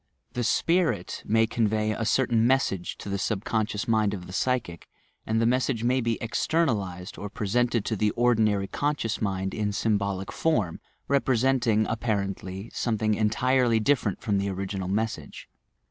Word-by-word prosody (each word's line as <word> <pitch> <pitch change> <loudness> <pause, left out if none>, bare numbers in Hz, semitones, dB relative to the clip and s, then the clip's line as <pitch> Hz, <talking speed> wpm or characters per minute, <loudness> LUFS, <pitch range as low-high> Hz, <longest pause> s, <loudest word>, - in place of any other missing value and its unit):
The 120 - -1
"spirit" 165 - +1
may 115 +1 +4
convey 110 -2 0
a 110 +1 -2
certain 120 -2 +2
message 125 -9 0
to - - -9
the 100 0 -2
subconscious 105 0 -1
mind 110 -3 +2
of 90 -2 -8
the 90 - -10
psychic, 115 -7 -1 0.4
and 110 +1 +1
the 115 - +2
mes 125 +1 +2
sage 115 -5 -2
may 130 +2 +2
be 115 -1 0
"externalized" 110 - -1
or 105 - -5
presented 115 +2 0
to 110 - -1
the 105 +1 +2
ordinary 110 -5 +3
conscious 140 0 -2
mind 95 -2 -1
in 105 -1 -1
symbolic 100 -2 -1
form, 110 - 0 0.3
representing, 130 -4 +2
appar 110 -3 -1
ently, 95 +4 -8
something 110 -2 0
entirely 115 +3 +2
different 110 -4 +1
from 100 -2 0
the 100 0 -1
original 95 0 -3
message. 110 +4 -3
110 Hz, 155 wpm, -26 LUFS, 100-120 Hz, 0.4 s, may